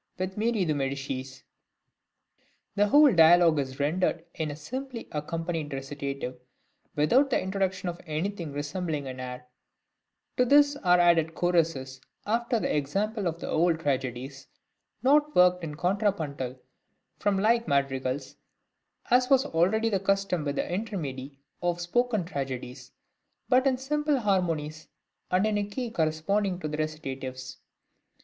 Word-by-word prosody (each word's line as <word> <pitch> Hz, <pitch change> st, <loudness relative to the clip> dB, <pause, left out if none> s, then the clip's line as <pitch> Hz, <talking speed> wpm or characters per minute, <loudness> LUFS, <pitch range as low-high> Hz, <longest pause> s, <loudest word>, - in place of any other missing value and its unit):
with 185 Hz, +1 st, -3 dB
Marie 220 Hz, -2 st, +1 dB
de 155 Hz, -, +1 dB
Medicis. 135 Hz, -1 st, -4 dB, 1.3 s
The 205 Hz, 0 st, +3 dB
whole 290 Hz, +3 st, +6 dB
dialogue 165 Hz, -1 st, +6 dB
is 135 Hz, 0 st, -4 dB
rendered 165 Hz, +3 st, 0 dB
in 155 Hz, -1 st, -3 dB
a 145 Hz, -, -5 dB
simply 255 Hz, -, -6 dB
accompanied 165 Hz, 0 st, -3 dB
recitative, 135 Hz, -2 st, -5 dB, 0.6 s
without 245 Hz, -, +3 dB
the 255 Hz, -, +2 dB
introduction 190 Hz, -1 st, -2 dB
of 175 Hz, 0 st, -5 dB
anything 165 Hz, +1 st, -3 dB
resembling 145 Hz, +1 st, -3 dB
an 130 Hz, -1 st, -7 dB
air; 125 Hz, 0 st, -7 dB, 0.9 s
to 250 Hz, -, +4 dB
this 285 Hz, +2 st, +5 dB
are 180 Hz, -8 st, +3 dB
added 165 Hz, -2 st, +3 dB
choruses, 160 Hz, -7 st, 0 dB, 0.2 s
after 235 Hz, +2 st, 0 dB
the -, -, -1 dB
example 200 Hz, +8 st, -1 dB
of 165 Hz, 0 st, -3 dB
the -, -, -6 dB
old 165 Hz, 0 st, +2 dB
tragedies, 135 Hz, -1 st, -3 dB, 0.6 s
not 295 Hz, +3 st, +3 dB
worked 180 Hz, 0 st, +6 dB
out 180 Hz, -, -16 dB
in 150 Hz, -2 st, -5 dB
contrapuntal 165 Hz, -, -1 dB, 0.6 s
form 205 Hz, -1 st, +1 dB
like 230 Hz, +4 st, +2 dB
madrigals, 135 Hz, -1 st, -1 dB, 0.7 s
as 250 Hz, +1 st, +4 dB
was 270 Hz, 0 st, +4 dB
already 195 Hz, -, +2 dB
the 200 Hz, -3 st, +1 dB
custom 195 Hz, -3 st, 0 dB
with 140 Hz, -1 st, -2 dB
the -, -, 0 dB
intermedii 150 Hz, -, -4 dB, 0.2 s
of 175 Hz, -1 st, 0 dB
spoken 215 Hz, +2 st, 0 dB
tragedies, 135 Hz, -5 st, -6 dB, 0.6 s
but 255 Hz, +1 st, +4 dB
in 260 Hz, -1 st, +2 dB
simple 295 Hz, +2 st, 0 dB
harmonies, 165 Hz, -, -1 dB, 0.4 s
and 185 Hz, +3 st, +2 dB
in 215 Hz, -1 st, +1 dB
a -, -, 0 dB
key 230 Hz, +4 st, -5 dB
corresponding 180 Hz, +3 st, 0 dB
to 155 Hz, -, -4 dB
the 150 Hz, 0 st, -4 dB
recitatives. 135 Hz, -4 st, -5 dB
170 Hz, 140 wpm, -27 LUFS, 145-205 Hz, 1.3 s, whole